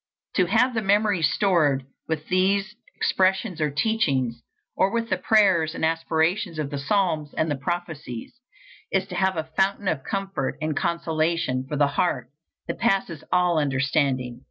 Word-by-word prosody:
To 185 -3 +4
have 235 +6 +3
the 220 - 0
memory 205 -2 +2
stored 155 -4 +2 0.2
with 155 -1 -3
these 195 +3 +1 0.2
expressions 190 -1 +1
or 150 - +2
teachings, 140 - 0 0.3
or 190 - +3
with 230 -1 -2
the - - +2
prayers 190 -7 +3
and - - 0
aspirations 165 +3 0
of 150 -2 -3
the 140 - -3
psalms 155 -2 0
and 160 -1 0
the - - +1
prophecies, 150 -5 -5 0.6
is 190 -1 +1
to 180 - -6
have 190 -1 +1
a 160 0 -4
fountain 195 +1 +1
of 145 -7 0
comfort 195 -8 -3
and 155 -1 -2
consolation 160 -5 0
for 150 - -2
the 145 0 +4
heart, 145 +4 -1 0.4
that - - -4
passes 195 -8 0
all 180 -2 +3
understanding. 135 -3 0
170 Hz, 155 wpm, -24 LUFS, 150-195 Hz, 0.6 s, To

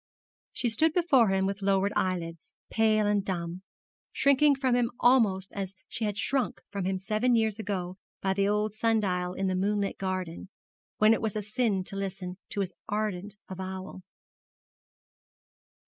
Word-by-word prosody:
She 245 - -1
stood 310 +8 +3
before 295 -10 +4
him 190 0 +2
with 200 +1 -2
lowered 195 +1 +2
eyelids, 170 -3 -2 0.2
pale 215 -1 +3
and 205 -1 +2
dumb, 175 -2 -3 0.5
shrinking 280 +1 +4
from 265 -2 +1
him 240 -1 +2
almost 210 -7 +3
as 195 -1 -4
she 225 - -3
had 205 -1 -2
shrunk 265 +4 0
from 200 -3 -3
him 190 0 0
seven 215 +6 +1
years 220 -2 +1
ago 185 -4 -3 0.2
by 190 0 0
the 195 0 +1
old 210 0 +1
sundial 205 -5 +1
in 195 - -1
the 185 - +1
moonlit 200 +1 0
garden, 185 -2 -3 0.5
when 215 +1 +6
it - - -1
was 220 -2 -2
a 210 - -2
sin 210 -2 0
to 195 - -9
listen 190 -2 -4
to 200 - -2
his 190 -2 -3 0.2
ardent 210 -1 -2
avowal. 190 0 -6
200 Hz, 160 wpm, -29 LUFS, 190-220 Hz, 0.5 s, when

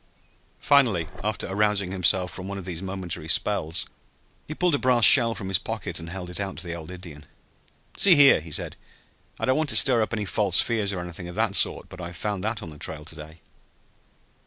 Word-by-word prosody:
Finally, 120 - +2 0.2
after 105 -1 -3
arousing 100 -1 0
himself 90 0 +1
from 95 0 -8
one 100 0 -6
of 95 - -8
these 90 -2 -5
momentary 95 -3 -6
spells, 80 +1 -1 0.6
he 155 - -6
pulled 180 -1 +1
a 145 - +1
brass 125 -3 +4
shell 115 -4 +9
from 95 - -7
his 95 -2 +1
pocket - - -4
and 85 - -8
held 90 0 -7
it 90 +1 -4
out 100 -1 -5
to 90 - -7
the 85 - -5
old 80 -2 -8
Indian. 85 -5 -11 0.7
"See 190 -4 +5
here," 140 -2 +6
he 80 - -12
said. 75 - -5 0.6
"I - - -1
don't 130 0 +1
want 155 -1 -1
to - - +3
stir 125 -4 +3
up 110 - -2
any 105 -2 -3
false 95 -2 +2
fears, 110 -4 0
or 90 -3 -4
anything 90 0 -8
of 90 - -9
that - - 0
sort - - +1
but 90 - -11
I 85 0 -7
found 100 +3 -4
that 110 0 -3
on 80 - -9
the 75 - -14
trail 75 -1 -6
to 80 - -9
day!" 80 +1 -12
95 Hz, 220 wpm, -24 LUFS, 85-110 Hz, 0.7 s, shell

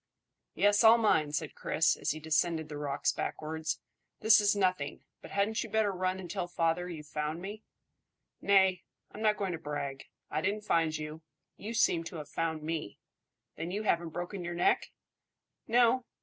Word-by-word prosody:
"Yes, 205 +2 +4
I'll 225 +1 +8
mind," 160 -10 +2
said - - -3
Chris, - - +1
as - - -3
he 155 - -1
descended 160 0 0
the 150 - -6
rocks 140 -2 0
backwards. 160 +1 -3 0.4
"This 220 0 +6
is 205 0 +3
nothing; 185 -7 0 0.2
but - - -11
hadn't 205 +3 0
you 230 - -8
better 215 -1 +2
run 185 0 -1
and 185 - -7
tell 180 0 -3
father 175 +1 0
you've 155 -3 -7
found 150 +1 -3
me?" 205 +4 -7 0.8
"Nay! 190 -2 +4 0.3
I'm 215 - -9
not 215 -1 +3
going 195 -2 -1
to 165 - -4
brag. 145 -3 -4 0.3
I 155 - 0
didn't 205 +3 -1
find 165 -5 +2
you; 155 +1 -7 0.3
you 225 +3 -6
seem 170 -6 +3
to 170 - -7
have 150 -2 -7
found 160 -2 -2
me. 155 -8 -4 0.6
Then 165 - -4
you 205 +4 -3
haven't 170 -5 +1
broken 175 +3 -5
your 175 0 -4
neck?" 175 - +2 0.8
"No." 240 +1 +4
175 Hz, 175 wpm, -31 LUFS, 155-205 Hz, 0.8 s, I'll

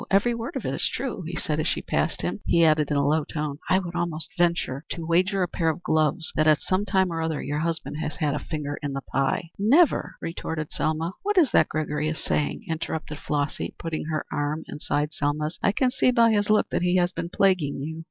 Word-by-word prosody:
Every 200 +5 +3
word 235 +7 -5
of - - -3
it - - -1
is - - 0
true," - - -3
he - - -5
said - - -2
as - - 0
she - - -1
passed - - -1
him. - - -2
He 170 -1 +5
added 155 -2 +3
in 145 - +1
a 140 - +2
low 155 +2 +2
tone 150 -1 -4
"I 185 - +5
would 180 -2 -3
almost 170 -2 -2
even 175 0 +5
venture 145 -5 -4
to 165 -2 -4
wager 185 +3 +2
a - - 0
pair 165 -1 0
of 160 +3 -3
gloves 160 0 +1
that 155 0 +3
at 155 -1 +5
some 190 +2 0
time 190 -3 +2
or 165 - -2
other 160 -2 -1
your 145 +1 -2
husband 165 -2 -2
has 155 -1 -3
had 150 -4 0
a 150 - -1
finger 145 -2 -4
in 145 -2 -3
the 135 - -3
pie." 135 +6 -1
"Never," 280 - +4
retorted 160 -2 -4
Selma. 160 +3 -1
"What 415 0 -1
is 310 - +5
that - - +4
Gregory 150 -1 -1
is 155 - -3
saying?" 150 +9 -1
interrupted 160 -2 -4
Flossy, 145 -1 -2
putting 165 -2 -4
her 155 -1 -2
arm 150 +2 -1
inside 150 +1 -2
Selma's. 150 +2 -1
"I - - +3
can 250 +5 +1
see 255 - +3
by 235 -2 +5
his 205 -1 +1
look 215 0 +3
that - - 0
he 180 +1 +2
has 175 -1 +3
been 170 - -4
plaguing 180 -8 +2
you." 160 +2 -5
160 Hz, 240 wpm, -25 LUFS, 150-185 Hz, -, He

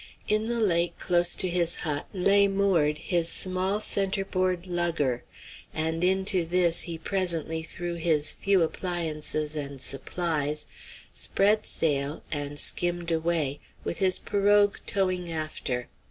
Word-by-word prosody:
In 215 +1 0
the 235 0 -2
lake, 170 -5 +1
close 175 -1 +2
to 185 - -1
his 175 -1 +1
hut, 150 -3 -4
lay 200 +1 +3
moored 190 -7 +1
his 170 +1 -1
small 185 +3 +4
centerboard 190 -3 +1
lugger, 170 -8 -1 0.5
and 160 +2 -2
into 190 0 +2
this 170 0 +3
he 170 -2 -3
presently 165 -3 0
threw 175 +2 -5
his 160 -3 +3
few 195 -3 +1
appliances 155 -3 -2
and 140 -2 -5
supplies, 150 +2 -1 0.5
spread 210 +2 +2
sail, 145 -1 -1
and 145 -1 -3
skimmed 175 +1 0
away, 160 -4 -1 0.2
with - - -4
his 185 -2 +4
pirogue 205 0 +2
towing 185 -3 -1
after. 155 -6 -4
175 Hz, 125 wpm, -26 LUFS, 155-190 Hz, 0.5 s, small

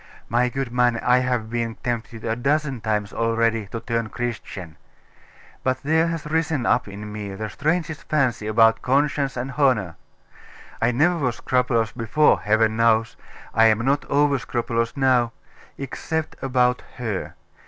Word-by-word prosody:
My 120 +2 +2
good 135 -1 -3
man, 120 -1 +2
I 125 +2 +3
have 125 -3 -1
been 115 -1 -2
tempted 115 -1 -4
a 115 0 0
dozen 140 0 0
times 105 -1 -1
already 115 -2 +1
to 115 - -5
turn 115 -1 -2
Christian: 110 -9 -5 0.9
but 130 +1 -1
there 160 +3 +2
has 165 -2 -3
risen 160 -4 0
up 120 - +2
in 105 +1 -8
me 100 -2 -5
the 110 +1 -5
strangest 160 +1 -2
fancy 130 -8 +1
about 115 +1 +4
conscience 140 0 +1
and 130 +3 -3
honour.... 125 - +1 0.9
I 115 +2 +3
never 160 +8 +2
was 125 -5 0
scrupulous 120 -3 +1
before, 120 +6 +2
Heaven 110 +1 +2
knows 115 -1 +3 0.4
I 115 +1 +5
am 110 +2 +2
not 140 +2 +2
over 145 -1 +2
scrupulous 115 0 -2
now 125 -3 +3 0.4
except 160 +3 -4
about 125 -1 +2 0.2
her. 110 -6 -4
120 Hz, 150 wpm, -23 LUFS, 115-135 Hz, 0.9 s, I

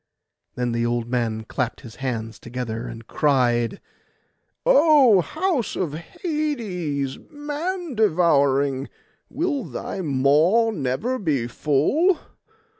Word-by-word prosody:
Then 125 -1 -1
the 115 0 0
old 120 0 -1
man 115 -3 -1
clapped 125 +2 -3
his 115 -2 -12
hands 115 -5 -4
together 120 -1 -5
and 115 -1 -9
cried— 125 - +1 0.9
'O 300 - +6
house 315 - -1
of 170 -6 -2
Hades, 180 - -3
man 305 +3 -4
devouring! 140 - +2 0.4
will 290 -2 -1
thy 195 - -5
maw 155 - +3
never 205 - -2
be 145 - 0
full? 155 - +2
150 Hz, 105 wpm, -23 LUFS, -, 0.9 s, O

